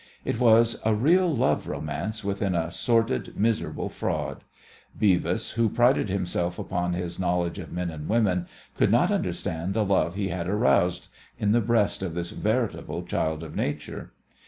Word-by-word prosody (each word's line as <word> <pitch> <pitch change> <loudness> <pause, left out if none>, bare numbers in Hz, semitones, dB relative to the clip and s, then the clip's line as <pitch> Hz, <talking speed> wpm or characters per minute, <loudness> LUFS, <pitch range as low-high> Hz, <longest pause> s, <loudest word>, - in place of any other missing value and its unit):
It 115 - -1
was 115 -1 +4
a 110 -1 +2
real 170 - +4
love 130 -2 +1
romance 110 +6 -4
within 100 -2 -1
a 85 0 -1
sordid, 115 +5 0
miserable 110 +2 0
fraud. - - -3 0.6
Beavis, 95 -4 +2
who 115 -1 +1
prided 120 -1 +3
himself 90 -2 -1
upon 90 0 -2
his 85 0 -4
knowledge 90 0 0
of 85 - -8
men 90 -1 -3
and 75 -1 -7
women, 100 -6 +2 0.3
could - - +3
not - - +4
understand 85 +5 -2
the 110 -2 +2
love 95 -3 +1
he 100 -1 -1
had 85 -1 -3
aroused 95 -4 +2 0.3
in 105 - +1
the 120 +2 +4
breast 115 -4 +1
of 90 -4 -4
this 85 0 -3
veritable - - -1
child 80 0 -2
of 80 - -9
nature. 75 0 -4
95 Hz, 160 wpm, -26 LUFS, 85-115 Hz, 0.6 s, was